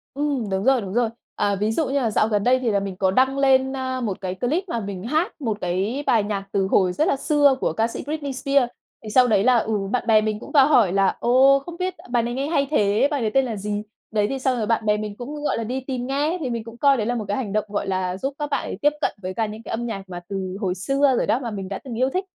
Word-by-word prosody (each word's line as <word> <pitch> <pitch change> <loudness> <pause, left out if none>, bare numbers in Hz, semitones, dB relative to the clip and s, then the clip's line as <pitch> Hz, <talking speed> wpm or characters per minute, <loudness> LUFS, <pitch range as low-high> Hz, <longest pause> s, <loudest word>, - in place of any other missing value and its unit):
Ừm, 280 -7 -1
đúng 190 0 -1
rồi, 265 -1 +3
đúng 195 0 -6
rồi, 240 -1 +2 0.3
à, 200 -1 +1
ví 210 +3 0
dụ 305 +7 0
như 270 - -3
là 230 -4 0
dạo 215 - +2
gần 210 -2 0
đây 255 +1 +4
thì 245 -3 0
là 200 - +2
mình 195 -1 -5
có 190 -1 +2
đăng 265 +6 +2
lên, 265 -1 +3
a, 260 -1 -3
một 210 -6 -3
cái 185 -1 -3
clip 280 - -1
mà 235 - -2
mình 195 -3 -6
hát 310 +7 -1
một 220 -6 -1
cái 195 +10 -1
bài 225 -3 +4
nhạc 200 -1 -3
từ 195 -1 +1
hồi 185 -2 +2
rất 310 - +1
là - - +2
xưa 285 0 +3
của - - 0
ca 225 +1 +1
sĩ - - -6
Britney 290 -2 -4
Spears. 275 -1 +1 0.3
Thì 215 - -7
sau 250 +3 +5
đấy 210 -3 +3
là 250 0 +5
ừ, 220 -1 0 0.2
bạn 250 - 0
bè 220 -1 +5
mình 215 -1 -2
cũng - - -11
vào 280 -3 +6
hỏi 225 -11 +4
là 195 -1 +2
"Ồ, 265 +3 +5
không 340 +5 -10
biết 365 0 -2 0.2
bài 240 -1 +1
này 240 +1 -3
nghe 270 +3 -2
hay 280 -3 +1
thế, 210 -1 +3
bài 285 -3 -1
đấy 215 -2 0
tên 270 -1 +3
là 230 -3 -3
gì?" 205 +1 -3 0.3
Đấy, 210 -1 +1
thì 270 - -3
xong 260 -1 0
rồi 220 -3 -1
bạn 225 -1 +1
bè 210 0 +3
mình 210 -1 -5
cũng, 290 +4 -7
gọi - - 0
là, 230 - -2
đi 250 +4 -3
tìm 255 -2 -3
nghe, 295 +6 0
thì 270 -6 -3
mình 230 -2 -3
cũng 230 +1 -11
coi 275 +1 +4
đấy 215 - -1
là 245 - -1
một 220 -3 -3
cái 205 - -1
hành 215 -7 -3
động, 215 0 0
gọi 205 -1 -3
là, 185 -1 -1
giúp 270 +7 -3
các 295 -1 -2
bạn - - -1
ấy - - -5
tiếp 295 +1 +3
cận - - 0
với 185 0 -4
cả 225 +3 0
những 215 +1 -8
cái - - -10
âm 235 +1 -2
nhạc 195 -5 -6
mà 175 -1 -6
từ 190 -1 -4
hồi 185 -3 -1
xưa 275 +8 +2
rồi - - 0
đó, 235 - +2
mà 240 -4 -5
mình 195 -3 -5
đã 195 - -4
từng 240 -4 -6
yêu 260 +2 +2
thích. 375 +1 -1
235 Hz, 305 wpm, -23 LUFS, 205-270 Hz, 0.3 s, vào